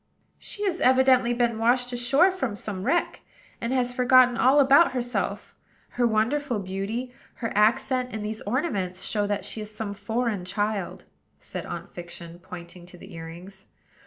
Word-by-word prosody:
"She 415 Hz, -, -7 dB
has 365 Hz, -3 st, -1 dB
evidently 255 Hz, -1 st, +4 dB
been 235 Hz, -2 st, 0 dB
washed 245 Hz, +2 st, +2 dB
ashore 270 Hz, +10 st, +3 dB
from 265 Hz, -, -3 dB
some 200 Hz, -2 st, -5 dB
wreck, 345 Hz, -, 0 dB, 0.4 s
and 235 Hz, -, -2 dB
has 250 Hz, -1 st, 0 dB
forgotten 250 Hz, 0 st, +5 dB
all 265 Hz, +4 st, +4 dB
about 280 Hz, +3 st, +6 dB
herself. 245 Hz, -1 st, -3 dB, 0.4 s
Her 245 Hz, -1 st, +1 dB
wonderful 240 Hz, +4 st, 0 dB
beauty, 200 Hz, +6 st, -4 dB, 0.2 s
her 230 Hz, -2 st, -4 dB
accent, 250 Hz, +4 st, +2 dB
and 215 Hz, -1 st, -5 dB
these 215 Hz, +1 st, -4 dB
ornaments 205 Hz, -, -2 dB
show 205 Hz, -2 st, -1 dB
that 205 Hz, -2 st, -2 dB
she 215 Hz, -, -6 dB
is 210 Hz, -, -6 dB
some 215 Hz, -1 st, -5 dB
foreign 215 Hz, 0 st, -2 dB
child," 200 Hz, +1 st, -3 dB, 0.3 s
said -, -, -7 dB
Aunt -, -, -6 dB
Fiction, 170 Hz, -1 st, -10 dB
pointing 175 Hz, -1 st, -11 dB
to 180 Hz, -, -14 dB
the 190 Hz, +2 st, -13 dB
earrings. 175 Hz, +4 st, -10 dB
225 Hz, 160 wpm, -25 LUFS, 195-255 Hz, 0.4 s, about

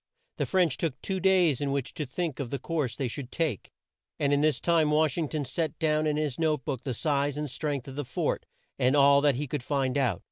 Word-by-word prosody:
The -, -, -1 dB
French 180 Hz, -7 st, +2 dB
took 150 Hz, -6 st, -2 dB
two 190 Hz, -1 st, -2 dB
days 180 Hz, -7 st, +3 dB
in 140 Hz, -1 st, 0 dB
which 140 Hz, -2 st, -2 dB
to 150 Hz, -5 st, -4 dB
think 155 Hz, 0 st, -3 dB
of 135 Hz, -4 st, -3 dB
the 140 Hz, -, -2 dB
course 140 Hz, -4 st, -2 dB
they 135 Hz, -, -2 dB
should 125 Hz, +1 st, -6 dB
take, 155 Hz, -, -2 dB, 0.5 s
and 145 Hz, -1 st, +1 dB
in 145 Hz, -, +3 dB
this 155 Hz, -3 st, +2 dB
time 165 Hz, -3 st, +3 dB
Wash 150 Hz, -2 st, +2 dB
ing 160 Hz, -4 st, -1 dB
ton 150 Hz, -3 st, -2 dB
set 155 Hz, +5 st, -2 dB
down 155 Hz, -1 st, +1 dB
in 150 Hz, 0 st, +1 dB
his 150 Hz, -3 st, -2 dB
note 155 Hz, -5 st, +1 dB
book 130 Hz, -4 st, -3 dB
the 130 Hz, -3 st, -3 dB
size 145 Hz, 0 st, 0 dB
and 150 Hz, 0 st, -2 dB
strength 140 Hz, -1 st, -3 dB
of 135 Hz, -, -8 dB
the 145 Hz, -, -2 dB
fort 125 Hz, -, -2 dB, 0.3 s
and 130 Hz, +3 st, +3 dB
all 140 Hz, 0 st, +6 dB
that 145 Hz, -2 st, +3 dB
he 145 Hz, +4 st, -2 dB
could 145 Hz, 0 st, -3 dB
find 135 Hz, 0 st, 0 dB
out. 120 Hz, -10 st, +1 dB
145 Hz, 245 wpm, -28 LUFS, 135-155 Hz, 0.5 s, all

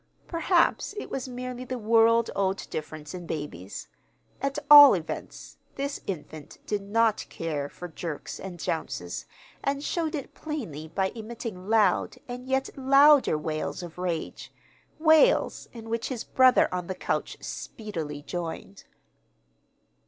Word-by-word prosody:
Perhaps 345 Hz, +4 st, +1 dB
it -, -, -6 dB
was 260 Hz, -1 st, -4 dB
merely 250 Hz, 0 st, -5 dB
the 255 Hz, 0 st, -4 dB
world 230 Hz, +1 st, +4 dB
old 195 Hz, 0 st, -1 dB
difference 155 Hz, 0 st, -6 dB
in 175 Hz, -2 st, -7 dB
babies. 100 Hz, -, -6 dB, 0.5 s
At 275 Hz, +1 st, -1 dB
all 290 Hz, -4 st, +11 dB
events, 165 Hz, -3 st, -7 dB, 0.2 s
this 280 Hz, +1 st, -3 dB
infant 155 Hz, -4 st, -7 dB
did 210 Hz, -1 st, -1 dB
not 220 Hz, +2 st, +1 dB
care 150 Hz, -4 st, -3 dB
for 180 Hz, -, -8 dB
jerks 160 Hz, -2 st, -6 dB
and 185 Hz, -2 st, -7 dB
jounces, 155 Hz, -, -4 dB, 0.4 s
and 280 Hz, +1 st, -1 dB
showed 325 Hz, 0 st, -1 dB
it 280 Hz, -, -6 dB
plainly 215 Hz, -, -6 dB
by 190 Hz, +4 st, -1 dB
emitting 220 Hz, -4 st, -7 dB
loud 220 Hz, +1 st, +3 dB
and 250 Hz, +1 st, -7 dB
yet 265 Hz, 0 st, -1 dB
louder 275 Hz, -, +5 dB
wails 155 Hz, +3 st, -3 dB
of 175 Hz, 0 st, -9 dB
rage 175 Hz, -3 st, -4 dB, 0.5 s
wails 315 Hz, +9 st, +4 dB
in 225 Hz, -2 st, -10 dB
which 230 Hz, 0 st, -2 dB
his 250 Hz, -4 st, -4 dB
brother 260 Hz, -1 st, +5 dB
on 180 Hz, -1 st, -3 dB
the 185 Hz, -, -3 dB
couch -, -, -2 dB
speedily 160 Hz, -10 st, -6 dB
joined. 165 Hz, -, -6 dB
215 Hz, 135 wpm, -27 LUFS, 165-260 Hz, 0.5 s, all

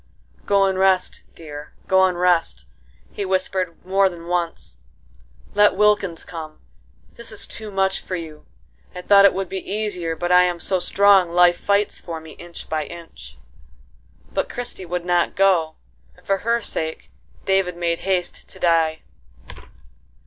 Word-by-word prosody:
"Go 200 Hz, -1 st, +4 dB
and 190 Hz, -1 st, 0 dB
rest, 190 Hz, -1 st, +2 dB
dear; 150 Hz, -2 st, -10 dB
go 190 Hz, -1 st, +5 dB
and 180 Hz, -2 st, -1 dB
rest," 170 Hz, -, +1 dB, 0.5 s
he 205 Hz, -, -4 dB
whispered 185 Hz, -2 st, -2 dB
more 195 Hz, +1 st, +3 dB
than 170 Hz, -2 st, -11 dB
once. 170 Hz, -, -3 dB, 0.7 s
"Let 205 Hz, -1 st, +4 dB
Wilkins 205 Hz, -4 st, +2 dB
come: 160 Hz, -4 st, -8 dB, 0.6 s
this 235 Hz, -1 st, -4 dB
is 215 Hz, -, -5 dB
too 220 Hz, -1 st, -9 dB
much 195 Hz, -1 st, 0 dB
for 185 Hz, -, -5 dB
you. 160 Hz, -3 st, -9 dB, 0.5 s
I 180 Hz, -, -7 dB
thought 200 Hz, 0 st, +6 dB
it 200 Hz, -, +6 dB
would 195 Hz, 0 st, -2 dB
be 190 Hz, +2 st, -4 dB
easier, 190 Hz, -5 st, -3 dB
but 175 Hz, +2 st, -2 dB
I 180 Hz, 0 st, +7 dB
am 175 Hz, -1 st, 0 dB
so 185 Hz, +1 st, 0 dB
strong 195 Hz, 0 st, +4 dB
life 175 Hz, 0 st, +4 dB
fights 200 Hz, 0 st, 0 dB
for 165 Hz, -2 st, -6 dB
me 160 Hz, 0 st, -12 dB
inch 175 Hz, 0 st, -11 dB
by 155 Hz, -1 st, -2 dB
inch." 170 Hz, +2 st, -11 dB, 1.0 s
But -, -, -1 dB
Christie 240 Hz, -7 st, -4 dB
would 175 Hz, 0 st, -3 dB
not 175 Hz, -1 st, +1 dB
go, 180 Hz, -5 st, +2 dB, 0.4 s
and -, -, -23 dB
for 195 Hz, -, +1 dB
her 235 Hz, +1 st, 0 dB
sake 160 Hz, -6 st, -5 dB, 0.3 s
David 190 Hz, -2 st, +1 dB
made 170 Hz, -1 st, -1 dB
haste 185 Hz, -2 st, -2 dB
to -, -, -13 dB
die. 165 Hz, -2 st, +2 dB
180 Hz, 155 wpm, -21 LUFS, 170-195 Hz, 1.0 s, I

